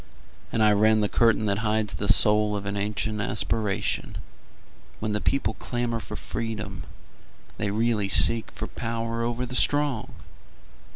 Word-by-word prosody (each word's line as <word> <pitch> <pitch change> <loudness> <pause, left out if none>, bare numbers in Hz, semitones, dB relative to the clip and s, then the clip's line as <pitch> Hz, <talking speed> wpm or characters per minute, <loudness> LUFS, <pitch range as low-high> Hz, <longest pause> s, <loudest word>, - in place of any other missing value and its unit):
And 110 - +1
I 105 - +5
rend 110 +1 +3
the - - +2
curtain 115 0 +2
that 100 0 0
hides 110 -1 0
the 100 - -3
soul 105 0 +4
Of 100 -1 -4
an 100 0 -3
ancient 105 +1 -2
aspiration: 105 0 -1 0.8
When 110 0 -2
the 105 0 -1
people 135 - 0
clamor 120 -1 -3
for - - -8
freedom 105 -4 -5 0.7
They 105 - 0
really 110 -1 0
seek 115 +3 +4
for - - -6
power 115 0 -4
o'er 120 +1 -2
the 125 - -8
strong. 145 -3 +1
110 Hz, 150 wpm, -25 LUFS, 105-115 Hz, 0.8 s, I